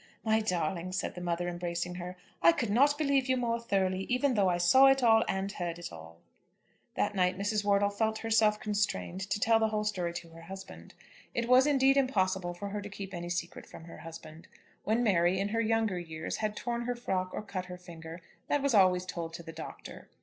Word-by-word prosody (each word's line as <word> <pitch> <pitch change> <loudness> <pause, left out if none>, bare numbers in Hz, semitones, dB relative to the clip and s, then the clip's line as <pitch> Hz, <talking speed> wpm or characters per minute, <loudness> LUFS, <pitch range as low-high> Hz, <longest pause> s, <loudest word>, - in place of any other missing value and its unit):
"My 220 -1 +3
darling," 180 -3 -2
said 195 - -2
the 180 - -8
mother, 175 0 -1
embracing 175 0 -3
her, 180 +1 -7 0.2
"I 170 0 +7
could 230 -3 -2
not 285 +6 +4
believe 280 -3 +1
you 260 - +3
more 235 -1 0
thoroughly 190 -4 0
even 255 +2 +2
though 200 -4 +3
I 175 - +1
saw 260 +10 +6
it 270 -1 +4
all, 225 -1 +6
and 190 +1 -1
heard 175 -4 -4
it 175 - -8
all." 80 0 -11 0.8
That 205 - 0
night 185 -1 +1
Mrs. 210 +1 0
Wortle 200 0 +3
felt 220 +1 0
herself 220 -2 +2
constrained 200 - -2
to 190 - 0
tell 225 +2 +4
the 220 - +3
whole 215 -1 -1
story 185 -5 -1
to 170 -1 -6
her 165 0 -13
husband. 190 +2 -10 0.4
It 235 0 -1
was 255 +3 +6
indeed 270 -1 +4
impossible 190 -9 +1
for 200 +3 -5
her 205 +1 -4
to 205 - -7
keep 195 -1 -8
any 175 0 -5
secret 175 0 -4
from - - -12
her 165 - -11
husband. 165 -1 -11 0.4
When 225 +3 +2
Mary, 185 -3 +3
in 200 +1 -1
her 225 +2 0
younger 220 -4 +1
years, 160 -2 -5
had 215 -1 -2
torn 235 +1 -3
her 245 0 -1
frock 190 -6 -2
or - - -5
cut 185 -3 -5
her 180 0 -8
finger, 170 -1 -10 0.2
that 290 -1 +1
was 280 -3 +2
always 185 -3 +4
told 165 -2 -5
to 170 - -8
the 165 -1 -9
Doctor. 160 - -9
195 Hz, 215 wpm, -30 LUFS, 175-225 Hz, 0.8 s, I